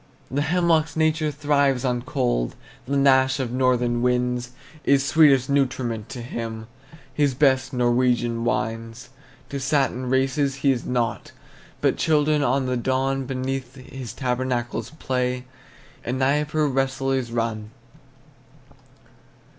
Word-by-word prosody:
The 140 Hz, +2 st, 0 dB
hemlock's 165 Hz, 0 st, +1 dB
nature 160 Hz, -1 st, +1 dB
thrives 140 Hz, -3 st, +1 dB
on 125 Hz, -1 st, 0 dB
cold; -, -, -1 dB, 0.3 s
The 140 Hz, +1 st, 0 dB
gnash 130 Hz, -1 st, +4 dB
of 125 Hz, -3 st, -2 dB
northern 125 Hz, -2 st, +1 dB
winds 125 Hz, 0 st, 0 dB, 0.3 s
Is 140 Hz, -1 st, +3 dB
sweetest 140 Hz, -4 st, +5 dB
nutriment 125 Hz, -5 st, -1 dB
to 120 Hz, -3 st, -7 dB
him, 115 Hz, -2 st, -5 dB, 0.5 s
His 145 Hz, -3 st, +1 dB
best 130 Hz, -1 st, +2 dB
Norwegian 120 Hz, -2 st, +1 dB
wines. 115 Hz, +1 st, -3 dB, 0.4 s
To 140 Hz, -, -4 dB
satin 135 Hz, -2 st, 0 dB
races 135 Hz, +1 st, +1 dB
he 140 Hz, -, +6 dB
is 125 Hz, -3 st, -3 dB
nought; 120 Hz, -2 st, -2 dB, 0.5 s
But -, -, +2 dB
children 150 Hz, -1 st, +2 dB
on 135 Hz, 0 st, +1 dB
the 125 Hz, 0 st, -1 dB
Don 130 Hz, +2 st, -1 dB
Beneath 130 Hz, -1 st, -4 dB
his 130 Hz, -2 st, -8 dB
tabernacles 125 Hz, -2 st, -2 dB
play, 125 Hz, -2 st, -2 dB, 0.6 s
And 125 Hz, +2 st, -2 dB
Dnieper 150 Hz, +3 st, +1 dB
wrestlers 135 Hz, -2 st, -1 dB
run. 115 Hz, -2 st, -2 dB
130 Hz, 120 wpm, -23 LUFS, 120-140 Hz, 0.6 s, he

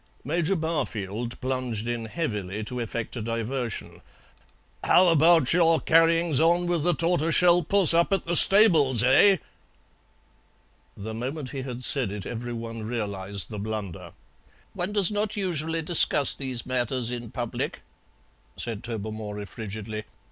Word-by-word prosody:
Major 170 Hz, +5 st, -1 dB
Barfield 120 Hz, -, -4 dB
plunged 125 Hz, -4 st, -3 dB
in 120 Hz, -1 st, -4 dB
heavily 105 Hz, -, -5 dB
to 125 Hz, +3 st, -6 dB
effect 115 Hz, 0 st, -5 dB
a 120 Hz, -, -5 dB
diversion. 115 Hz, +1 st, -5 dB, 0.8 s
"How 180 Hz, 0 st, +4 dB
about 165 Hz, -3 st, +3 dB
your 165 Hz, -2 st, +3 dB
carryings 165 Hz, -2 st, +2 dB
on 170 Hz, +2 st, +2 dB
with 175 Hz, -2 st, -1 dB
the 175 Hz, +1 st, +1 dB
tortoiseshell 170 Hz, +1 st, +3 dB
puss 185 Hz, +1 st, +5 dB
up 170 Hz, +3 st, +2 dB
at 195 Hz, -3 st, -1 dB
the 170 Hz, +1 st, -2 dB
stables, 160 Hz, -, +6 dB
eh?" 185 Hz, +10 st, +4 dB, 1.6 s
The 110 Hz, +2 st, -7 dB
moment 130 Hz, +4 st, -6 dB
he 135 Hz, -, -6 dB
had 125 Hz, -1 st, -6 dB
said 125 Hz, -6 st, +1 dB
it 100 Hz, -2 st, -7 dB
every 120 Hz, +1 st, -6 dB
one 115 Hz, -1 st, -7 dB
realized 100 Hz, -3 st, -2 dB
the 105 Hz, -, -6 dB
blunder. 105 Hz, -4 st, -7 dB, 0.6 s
"One 180 Hz, +3 st, -3 dB
does 205 Hz, -2 st, +3 dB
not 210 Hz, +1 st, -3 dB
usually 165 Hz, -4 st, -2 dB
discuss 150 Hz, -4 st, +5 dB
these 130 Hz, -4 st, -4 dB
matters 125 Hz, -1 st, -2 dB
in 120 Hz, -2 st, -6 dB
public," 120 Hz, -1 st, -5 dB, 0.7 s
said 115 Hz, -3 st, -5 dB
Tobermory 110 Hz, -2 st, -6 dB
frigidly. 110 Hz, 0 st, -7 dB
130 Hz, 135 wpm, -25 LUFS, 110-165 Hz, 1.6 s, stables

